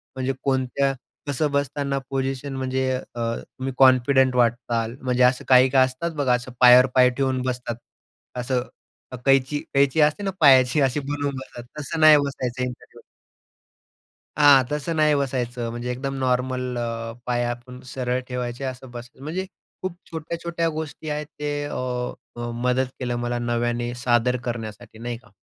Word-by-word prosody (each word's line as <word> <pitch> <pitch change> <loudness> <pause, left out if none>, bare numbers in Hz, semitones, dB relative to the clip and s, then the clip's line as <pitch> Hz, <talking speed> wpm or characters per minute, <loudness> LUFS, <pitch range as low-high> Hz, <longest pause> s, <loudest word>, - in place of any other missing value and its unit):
म्हणजे 130 0 -1
कोणत्या 135 0 +1 0.3
कसं 145 +1 0
बसताना 140 0 -1
पोजिशन 135 0 -2
म्हणजे 130 0 -1
अ, - - -2 0.4
तुम्ही 130 0 -6
कॉन्फिडंट 130 0 +5
वाटताल. 120 -1 +1
म्हणजे 125 -1 +1
असं 125 +1 +3
काही 130 0 +6
काही 130 0 +5
असतात. 130 +6 -4
बघा, 145 -5 +1
असं 125 +1 -2
पायावर 125 0 +8
पाय 125 -1 +6
ठेवून 130 0 -1
बसतात, 125 -2 -3 0.6
असं 125 0 -1 0.5
अ, - - -5
कैची 135 +1 +3
कैची 140 +2 +3
असते 150 +6 +2
ना 195 - -1
पायाची 135 -1 +6
अशी 135 +1 +2
बनवून 145 0 -3
बसतात, 130 -2 -8 0.2
तसं 150 +3 -4
नाही 155 -1 +8
बसायचं 130 -3 -2
इंटरव्ह्यूला. 125 -1 -8 1.4
हां, 145 -3 +7
तसं 150 +3 -2
नाही 155 -1 +4
बसायचं. 125 -4 -2
म्हणजे 120 +1 -5
एकदम 135 +2 -4
नॉर्मल 125 -1 -1
अ, 115 -1 -3
पाय 120 -1 0
आपण 120 +1 -6
सरळ 125 -1 -2
ठेवायचे 125 0 -4
असं 130 -1 -6
बस 120 0 -8
म्हणजे 160 +7 -4 0.4
खूप 185 -2 -4
छोट्या-छोट्या 165 +1 -3
गोष्टी 155 0 -6
आहेत. 150 0 -3
ते 145 0 -2
अ, 145 - -6 0.9
मदत 125 +1 +2
केलं 125 -1 -2
मला 120 0 -1
नव्याने 120 0 -1
सादर 125 +1 +2
करण्यासाठी 115 -1 -6
नाही 120 0 -4
का. 120 - -22
130 Hz, 150 wpm, -23 LUFS, 125-140 Hz, 1.4 s, पायावर